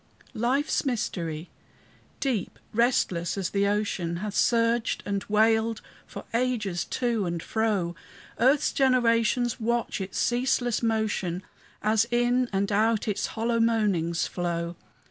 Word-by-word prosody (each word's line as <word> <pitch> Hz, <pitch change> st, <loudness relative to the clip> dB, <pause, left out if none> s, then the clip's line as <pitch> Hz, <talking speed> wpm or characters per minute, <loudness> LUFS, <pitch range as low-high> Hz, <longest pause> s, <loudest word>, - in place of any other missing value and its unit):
Life's 260 Hz, +6 st, +1 dB
mystery 175 Hz, -, -3 dB, 0.7 s
deep, 245 Hz, -9 st, -2 dB, 0.2 s
restless 210 Hz, -7 st, +1 dB
as 190 Hz, -3 st, -2 dB
the 200 Hz, 0 st, +2 dB
ocean 200 Hz, -5 st, -1 dB
Hath 205 Hz, +3 st, -4 dB
surged 230 Hz, 0 st, +2 dB
and 200 Hz, -1 st, -2 dB
wailed 220 Hz, +1 st, +2 dB, 0.3 s
for -, -, -9 dB
ages 230 Hz, -8 st, 0 dB
to 235 Hz, -6 st, -1 dB
and 170 Hz, -1 st, -3 dB
fro; 205 Hz, -6 st, 0 dB, 0.4 s
Earth's 270 Hz, +5 st, +3 dB
generations 240 Hz, -2 st, +2 dB
watch 235 Hz, -2 st, -1 dB
its 190 Hz, 0 st, -5 dB
ceaseless 245 Hz, -1 st, +1 dB
motion, 215 Hz, -6 st, -1 dB, 0.4 s
As 220 Hz, +1 st, +3 dB
in 245 Hz, +1 st, +2 dB
and 200 Hz, +1 st, 0 dB
out 220 Hz, +2 st, +2 dB
its 210 Hz, -, -1 dB
hollow 230 Hz, +1 st, +1 dB
moanings 205 Hz, -8 st, +1 dB
flow. 170 Hz, -1 st, -3 dB
220 Hz, 120 wpm, -27 LUFS, 195-240 Hz, 0.7 s, Earth's